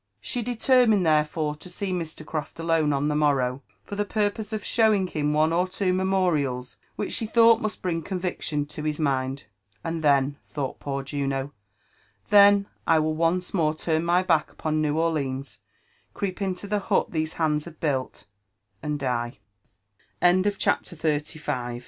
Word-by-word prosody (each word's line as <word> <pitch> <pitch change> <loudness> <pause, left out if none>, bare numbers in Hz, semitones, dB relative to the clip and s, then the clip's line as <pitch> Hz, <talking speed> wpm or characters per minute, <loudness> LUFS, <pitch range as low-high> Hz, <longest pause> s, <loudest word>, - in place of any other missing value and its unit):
She 245 - -2
determined 235 -3 +3
therefore 150 -1 +1
to 180 - -10
see 190 +2 -4
Mr. 165 -3 -5
Croft 155 0 -5
alone 165 -2 +2
on 140 +1 0
the 150 - +1
morrow, 135 -3 +1 0.2
for 205 - -7
\he 205 - 0
purpose 210 +1 -1
of 215 -1 -3
sheiying 215 -4 +3
him 150 -1 0
one 155 +2 +2
or 180 +2 +2
tWo 185 0 0
memorials 160 -10 0 0.2
which - - -3
she 225 - 0
thought 230 0 +5
must 215 0 -3
bring 170 -3 -1
con 185 +3 -4
Tfctiin 155 -5 -2
to 150 - -7
his 150 0 -2
mind; 135 -2 -1 0.4
and 165 -1 -3
then," 140 -1 +3
thought 140 -3 -4
poor 140 -1 -3
lun'o, 135 0 -2 0.3
— - - -39 0.2
*' 100 0 -39
then 200 -1 +7 0.2
I 165 - +5
will 155 0 +1
once 170 +3 0
more 160 -4 +1
turn 160 0 0
my 175 +2 +3
back 165 -4 +2
upon 155 -1 -1
New 150 0 0
Orleans 140 -5 -1 0.3
— - - -39
creep 195 -1 -3
into 190 0 -2
the 210 +1 0
hut 195 - 0
these 160 -1 -1
hands 150 -1 0
160 Hz, 155 wpm, -25 LUFS, 150-190 Hz, 0.4 s, then